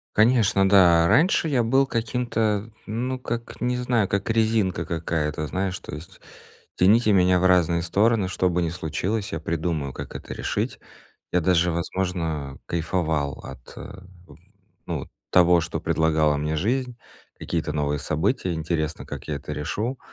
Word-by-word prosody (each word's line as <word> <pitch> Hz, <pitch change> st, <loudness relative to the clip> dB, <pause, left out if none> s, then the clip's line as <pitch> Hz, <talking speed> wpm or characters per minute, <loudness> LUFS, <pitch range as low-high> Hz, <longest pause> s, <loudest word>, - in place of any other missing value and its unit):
Конечно, 110 Hz, -4 st, +4 dB
да. 85 Hz, -4 st, +6 dB
Раньше 165 Hz, -, +3 dB
я 130 Hz, -6 st, +2 dB
был 135 Hz, +4 st, +3 dB
каким-то, 115 Hz, -3 st, -1 dB, 0.2 s
ну, 125 Hz, +4 st, -3 dB
как, 120 Hz, -2 st, -5 dB
не 125 Hz, 0 st, 0 dB
знаю, 125 Hz, -4 st, +1 dB
как 100 Hz, +3 st, -2 dB
резинка 110 Hz, -6 st, +1 dB
какая-то, 80 Hz, -3 st, -2 dB
знаешь. 95 Hz, +5 st, -2 dB
То -, -, -8 dB
есть 90 Hz, +5 st, -12 dB, 0.5 s
тяните 105 Hz, +4 st, +4 dB
меня 90 Hz, -1 st, +4 dB
в 95 Hz, -, +1 dB
разные 85 Hz, -2 st, +3 dB
стороны, 100 Hz, +4 st, +2 dB
что 90 Hz, 0 st, 0 dB
бы 90 Hz, 0 st, 0 dB
ни 85 Hz, -, 0 dB
случилось, 90 Hz, +5 st, -3 dB
я 80 Hz, -, -2 dB
придумаю, 80 Hz, -3 st, -2 dB
как -, -, -8 dB
это -, -, -7 dB
решить. -, -, -3 dB, 0.5 s
Я 90 Hz, -, +3 dB
даже, 90 Hz, 0 st, +3 dB
возможно, 80 Hz, -5 st, -3 dB
кайфовал 80 Hz, -4 st, -1 dB
от, -, -, -11 dB
э, 100 Hz, -1 st, -9 dB, 0.9 s
ну, -, -, -3 dB
вот -, -, -9 dB, 0.2 s
того, 90 Hz, -1 st, +5 dB
что 80 Hz, +1 st, -4 dB
предлагала 80 Hz, -2 st, +2 dB
мне 75 Hz, +2 st, -2 dB
жизнь, 125 Hz, -, -1 dB, 0.4 s
какие-то 85 Hz, -2 st, -3 dB
новые 75 Hz, -1 st, -1 dB
события, 90 Hz, -, -1 dB
интересно, 80 Hz, -1 st, -2 dB
как -, -, -8 dB
я 75 Hz, -, -1 dB
это 75 Hz, +2 st, -7 dB
решу. 110 Hz, -, -3 dB
90 Hz, 150 wpm, -24 LUFS, 80-110 Hz, 0.9 s, да